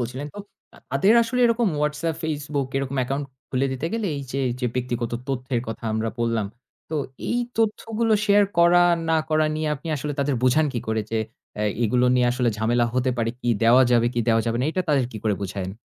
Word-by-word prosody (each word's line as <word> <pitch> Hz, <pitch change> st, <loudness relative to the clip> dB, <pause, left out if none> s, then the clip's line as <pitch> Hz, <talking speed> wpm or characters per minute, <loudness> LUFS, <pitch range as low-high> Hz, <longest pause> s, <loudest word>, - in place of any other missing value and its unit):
বলছিলেন 125 Hz, +4 st, -4 dB
তো -, -, -8 dB, 0.4 s
আ -, -, -16 dB
তাদের 140 Hz, -, +4 dB
আসলে 250 Hz, +2 st, -1 dB
এরকম 230 Hz, -2 st, +2 dB
WhatsApp, 150 Hz, +2 st, -1 dB
Facebook 145 Hz, -3 st, -2 dB
এরকম 135 Hz, 0 st, -2 dB
account 135 Hz, +3 st, -2 dB, 0.3 s
খুলে 130 Hz, +1 st, +1 dB
দিতে 130 Hz, +5 st, -3 dB
গেলে 225 Hz, -2 st, -1 dB
এই 140 Hz, -, -4 dB
যে, 135 Hz, -, -1 dB, 0.2 s
যে 125 Hz, -, +1 dB
ব্যক্তিগত 120 Hz, -2 st, -2 dB, 0.2 s
তথ্যের 130 Hz, -2 st, -1 dB
কথা 115 Hz, -, -6 dB
আমরা 110 Hz, +1 st, -1 dB
বললাম। 115 Hz, -3 st, 0 dB, 0.4 s
তো -, -, -3 dB, 0.3 s
এই 240 Hz, -, +1 dB, 0.2 s
তথ্যগুলো 225 Hz, 0 st, 0 dB
share 205 Hz, 0 st, +5 dB
করা 170 Hz, +1 st, +6 dB, 0.3 s
না 160 Hz, -, +3 dB
করা 155 Hz, 0 st, +2 dB
নিয়ে 155 Hz, 0 st, -1 dB
আপনি 150 Hz, +4 st, -9 dB
আসলে 145 Hz, +2 st, -3 dB
তাদের 140 Hz, 0 st, +1 dB
বুবোঝান 130 Hz, +5 st, +4 dB
কি 120 Hz, -, -2 dB
করে 110 Hz, 0 st, +1 dB
যে 115 Hz, -, 0 dB, 0.4 s
অ্যা 105 Hz, -, -1 dB, 0.2 s
এগুলো 125 Hz, +3 st, +2 dB
নিয়ে 125 Hz, -1 st, +3 dB
আসলে 125 Hz, -1 st, +1 dB
ঝামেলা 120 Hz, +2 st, +2 dB
হতে 130 Hz, 0 st, +1 dB
পারে, 115 Hz, -1 st, 0 dB
কি 120 Hz, -, -2 dB
দেওয়া 120 Hz, +3 st, +6 dB
যাবে 120 Hz, -1 st, +4 dB
কি 120 Hz, -, -1 dB
দেওয়া 115 Hz, 0 st, +4 dB
যাবে 115 Hz, 0 st, 0 dB
না -, -, +1 dB
এইটা 185 Hz, +3 st, -1 dB
তাদের 140 Hz, -5 st, +2 dB
কি 110 Hz, -, -6 dB
করে 105 Hz, -, +2 dB
বুঝায়েন? 95 Hz, -1 st, -4 dB
135 Hz, 210 wpm, -24 LUFS, 120-155 Hz, 0.4 s, করা